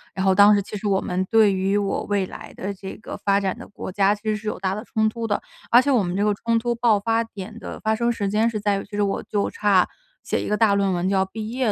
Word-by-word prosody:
然 190 - -1
后 190 - +5
当 205 +2 +7
时 - - +2
其 205 - -8
实 210 +1 -3
我 195 -1 +2
们 180 0 -2
对 220 -3 +5
于 195 +2 +1
我 200 -1 -1
未 200 -2 0
来 - - -10
的 200 +2 -4
这 190 0 -8
个 - - -8
发 200 0 +2
展 190 -2 -1
的 - - -10
国 205 - -7
家 200 +1 +3
其 205 - -19
实 215 -1 0
是 210 +1 -7
有 - - -2
大 190 0 -1
的 210 +2 -5
冲 220 0 0
突 230 +1 -4
的， 205 - 0 0.3
而 240 - +8
且 280 +2 0
我 250 -5 +4
们 175 0 -3
这 200 - +1
个 210 - +3
冲 230 +3 0
突 240 +1 0
爆 230 -3 +2
发 225 +2 +1
点 220 0 -9
的 - - -8
发 220 0 0
生 235 +1 +1
时 210 -4 -2
间 215 +3 +2
是 215 -2 -3
在 205 -1 +1
于， - - -6
其 205 - -9
实 205 - +1
我 200 - -1
就 205 -1 -1
差 200 -3 +3 0.4
写 - - -1
一 - - -4
个 210 - +1
大 215 -3 +4
论 200 -1 +1
文 175 +1 -1
就 195 - +1
要 190 - +3
毕 215 +3 -6
业 250 -3 0
205 Hz, 330 characters per minute, -23 LUFS, 195-220 Hz, 0.4 s, 而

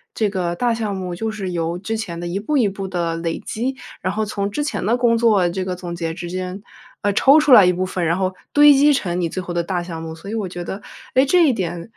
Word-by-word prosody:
这 215 -2 +1
个 175 -3 -2
大 240 +4 +1
项 215 -3 -2
目 185 -2 -4
就 220 +6 -3
是 200 -4 -4
由 170 0 -2
之 205 +5 -4
前 195 -7 -5
的 175 - -5
一 180 +3 -2
步 290 +9 -1
一 235 -6 +3
步 195 0 -5
的 170 -3 -2
累 165 -1 -3
积， 250 +5 -2 0.3
然 185 - -1
后 215 +1 -1
从 200 -1 -2
之 295 +8 -2
前 290 - -3
的 230 +6 +2
工 240 -2 +3
作 210 -6 +3
这 185 +2 -2
个 185 -1 -3
总 175 -1 -6
结 165 -1 -3
之 175 0 -6
间 185 +2 -5 0.4
呃， 205 0 +1
抽 275 +9 +6
出 300 -2 +2
来 210 -6 +9
一 - - +5
部 185 +1 -1
分， 185 -1 -3
然 170 +3 +1
后 190 0 -1 0.2
堆 290 0 +7
积 290 +2 +5
成 180 -7 -1
你 170 - 0
最 185 +1 -4
后 175 - -5
的 170 - 0
大 175 0 -2
项 165 -2 -7
目。 160 0 -6
所 195 +6 -9
以 - - -4
我 210 -5 -2
觉 175 0 -6
得， 190 +4 -6 0.3
诶， 260 - +5
这 335 +2 +4
一 260 - +3
点， 175 0 -4
190 Hz, 300 characters per minute, -20 LUFS, 175-225 Hz, 0.4 s, 来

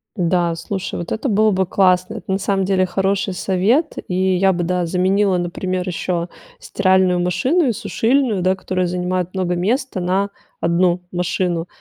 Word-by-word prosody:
Да, 175 -2 +1
слушай, 190 +3 -5
вот 170 - -6
это 225 - -2
было 215 -1 +3
бы 190 -1 +1
классно. 185 +2 +2
Это 205 - -6
на 190 - +2
самом 195 -1 0
деле 185 -1 +2
хороший 195 +1 -1
совет. 205 - +1
И 185 +1 +1
я 190 +1 +3
бы, 175 0 -2
да, 180 0 0
заменила, 190 +2 +2
например, 185 +1 -3
еще 175 0 -2 0.3
стиральную 185 - +2
машину 190 - +1
и - - +2
сушильную, 230 0 0
да, 185 +1 +2
которая 185 -1 -2
занимает 180 0 -2
много 185 -2 -1
места, 225 +5 -1
на 190 +3 0 0.3
1 175 +1 +2
машину, 175 -1 -1
185 Hz, 165 wpm, -19 LUFS, 180-195 Hz, 0.3 s, было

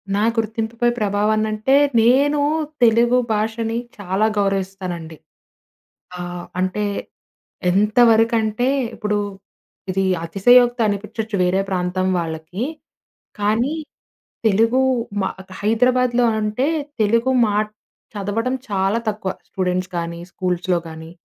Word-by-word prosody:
నా 205 - +1 0.2
గుర్తింపుపై 225 +2 -1
ప్రభావం 205 +1 +1
అనంటే, 215 +5 +1 0.3
నేను 280 +5 +4 0.4
తెలుగు 235 +2 +4 0.2
భాషని 225 +2 -1 0.2
చాలా 200 +2 0
గౌరవిస్తానండి. 190 -5 -2 1.0
ఆహ్, 175 0 -6
అంటే 185 +3 -1 0.9
ఎంతవరకంటే 225 +2 +3 0.3
ఇప్పుడు 210 -2 -1 0.7
ఇది 195 +1 0 0.2
అతిశయోక్తి 240 +7 +4
అనిపించొచ్చు 210 +1 -3
వేరే 185 +2 +2
ప్రాంతం 185 0 -1
వాళ్ళకి. 165 +5 -4 0.8
కానీ 220 +8 +1 0.7
తెలుగు 225 +5 +3 0.4
మా 190 - 0 0.2
క - - -15
హైదరాబాద్‌లొ, 245 +2 +2
అంటే 215 +5 0 0.3
తెలుగు 230 +5 +2
మా 205 -1 0 0.6
చదవడం 225 +6 -1
చాలా 195 +3 +1
తక్కువ 210 -3 -2 0.2
స్టూడెంట్స్ 185 -1 -1
కానీ, 170 0 -4
స్కూల్స్‌లో 180 -1 -1
కానీ. 160 +1 -10
210 Hz, 95 wpm, -20 LUFS, 185-230 Hz, 1.0 s, నేను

